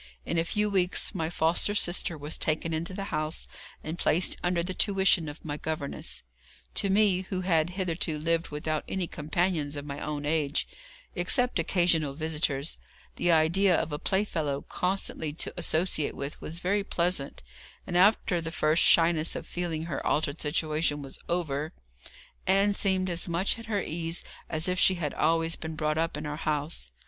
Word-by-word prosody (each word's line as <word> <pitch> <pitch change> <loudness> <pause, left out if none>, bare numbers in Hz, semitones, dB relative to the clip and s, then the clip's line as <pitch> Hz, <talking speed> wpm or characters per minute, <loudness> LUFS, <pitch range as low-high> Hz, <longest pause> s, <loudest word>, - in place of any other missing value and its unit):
In 165 - 0
a - - +2
few 210 +5 +1
weeks 190 -1 +1
my 165 -4 -2
foster 170 +5 +2
sister 175 -3 +2
was 150 +2 -2
taken 160 +1 -1
into 165 +3 -2
the 195 +1 -4
house, 155 +1 -1 0.4
and 160 +3 -5
placed 175 +4 +2
under 175 -1 +1
the 185 +2 -3
tuition 190 -5 +4
of 145 +3 -11
my 145 -1 -3
governess. 155 -3 -4 0.5
To 200 - +1
me, 195 -2 +4
who 185 -2 -2
had 170 -3 +2
hitherto 170 -4 0
lived 165 +2 0
without 155 +1 -2
any 190 -2 -1
companions 155 -1 -1
of 145 0 -5
my 140 -1 -5
own 150 -1 -4
age, 150 -1 +1 0.5
except 250 - +1
occasional 165 -4 +2
visitors, 150 -1 -1 0.4
the 175 - +3
idea 170 +4 +4
of 160 - -1
a 145 - -3
play 190 +1 +1
fellow 150 -8 -2
constantly 180 -4 -2
to 155 - -2
associate 165 -2 0
with 140 +2 -6
was 165 - -4
very 200 +4 0
pleasant, 170 - -1 0.4
and, 175 - -5
after 185 -2 +4
the 165 - -4
first 155 0 +2
shyness 165 -1 +4
of - - -5
feeling 170 -3 -3
her 160 -5 -4
altered 150 0 0
situation 150 -1 0
was 135 - -8
over, 155 -3 -1 0.7
Ann 195 +2 +4
seemed 190 -2 +1
as 175 -1 -1
much 180 +7 0
at 230 - -10
her 205 -3 0
ease 165 +1 -3 0.3
as 160 +1 +1
if 180 0 0
she 190 - +5
had 155 -5 -3
always 165 +1 +2
been 160 0 -6
brought 155 0 0
up 165 -2 -1
in 150 - -5
our 150 0 -4
house. 150 - -2
165 Hz, 175 wpm, -28 LUFS, 155-180 Hz, 0.7 s, she